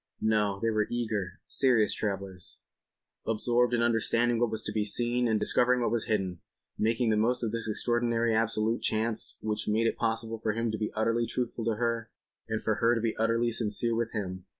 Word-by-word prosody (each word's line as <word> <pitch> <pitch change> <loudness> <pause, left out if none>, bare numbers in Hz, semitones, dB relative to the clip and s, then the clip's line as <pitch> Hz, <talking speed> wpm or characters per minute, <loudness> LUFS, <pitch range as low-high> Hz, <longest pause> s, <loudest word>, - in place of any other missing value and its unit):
No, 105 -2 +1
they 115 +1 0
were 110 -1 0
eager, 110 -5 -3
serious 120 -6 +3
travellers, 95 -3 -5 0.7
absorbed 120 +2 +2
in 115 - +1
understanding 115 0 +2
what 120 -1 +2
was 110 0 -3
to - - -3
be 105 - 0
seen 120 +3 +1
and 110 -2 +1
discovering 125 +3 +2
what 120 - 0
was 115 -2 0
hidden—making 110 +3 -2
the 105 - +2
most 120 +3 +1
of 110 - -1
this 115 -1 0
extraordinary 115 +1 +1
absolute 110 0 0
chance 110 0 +1
which 105 -1 -2
made 110 +2 +1
it - - 0
possible 115 0 -2
for 110 -1 -1
him 115 0 -1
to 110 - -3
be 105 - -2
utterly 115 +2 +1
truthful 120 -1 -3
to 115 -1 +1
her 115 0 -2 0.4
and 110 0 -2
for 110 -1 0
her 115 +1 +4
to - - 0
be 115 -1 -1
utterly 115 +1 +1
sincere 115 +1 +1
with 115 0 -1
him. 95 -4 -5
115 Hz, 195 wpm, -29 LUFS, 110-120 Hz, 0.7 s, her